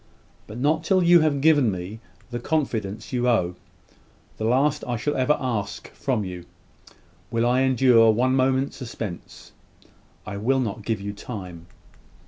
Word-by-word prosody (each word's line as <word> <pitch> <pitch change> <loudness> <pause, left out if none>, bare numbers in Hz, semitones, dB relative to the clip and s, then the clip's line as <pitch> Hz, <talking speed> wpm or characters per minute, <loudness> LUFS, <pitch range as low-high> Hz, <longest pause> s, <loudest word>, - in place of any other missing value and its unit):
But 105 - -9
not 155 +5 +1
till 185 +1 +2
you 175 0 +7
have 150 -3 +1
given 145 -5 +4
me 95 +4 -6 0.3
the 120 - -3
confidence 110 -8 -2
you 125 0 +1
owe 90 -7 +1 0.8
the 110 - -3
last 135 +5 +2
I 120 -1 -1
shall 145 +6 -2
ever 130 +3 +2
ask 105 -7 -4
from 120 -7 -2
you 90 -2 -7 0.8
will 115 0 0
I 125 +2 +3
endure 125 -3 +5
one 125 +4 +2
moment's 130 +1 +1
suspense. 115 -8 -8 0.7
I 105 -1 -6
will 130 +6 +1
not 110 -4 -3
give 110 -3 -1
you 100 +1 -5
time." 90 -6 -8
120 Hz, 150 wpm, -24 LUFS, 105-135 Hz, 0.8 s, you